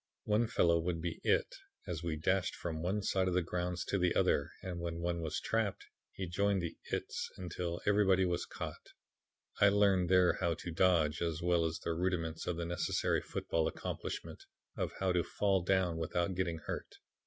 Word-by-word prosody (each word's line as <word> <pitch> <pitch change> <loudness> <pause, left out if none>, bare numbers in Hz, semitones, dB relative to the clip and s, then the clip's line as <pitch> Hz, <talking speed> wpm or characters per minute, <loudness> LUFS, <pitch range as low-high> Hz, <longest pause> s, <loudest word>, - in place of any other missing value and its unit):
One 110 +2 +2
fellow 85 -7 +3
would 85 0 -1
be 85 0 -4
'it' - - +2 0.3
as 85 -3 -4
we 85 -2 -2
dashed 90 +3 +1
from 80 -2 -4
one 95 +4 -1
side 95 -1 +1
of 90 - 0
the 90 - +3
grounds 90 +1 -2
to 100 - 0
the 90 -1 +2
other 70 +3 +2
and 90 -2 -4
when 85 -1 -3
one 85 0 -1
was 80 -2 -2
trapped 110 -4 -1 0.3
he 95 - -4
joined 100 +1 +1
the 85 - -3 0.2
'its,' - - -2
until 90 -1 -4
everybody 95 -2 +4
was 90 -1 -1
caught. - - -7 0.7
I 100 - +7
learned 100 -3 +3
there 90 -1 +5
how 85 -1 +1
to 85 - -6
dodge, 80 -3 +3
as 85 -1 -1
well 85 -1 +3
as 80 0 -1
the 85 - -2
rudiments 85 -2 -1
of 90 -2 -1
the 85 - -2
necessary 85 0 0
football 80 -1 -1
accomplishment - - -5 0.3
of - - -2
how 95 -1 +2
to 90 -1 +2
fall 100 -2 +1
down 90 -2 +1
without 85 +3 -1
getting 90 -2 -1
hurt. - - -5
90 Hz, 190 wpm, -34 LUFS, 85-95 Hz, 0.7 s, I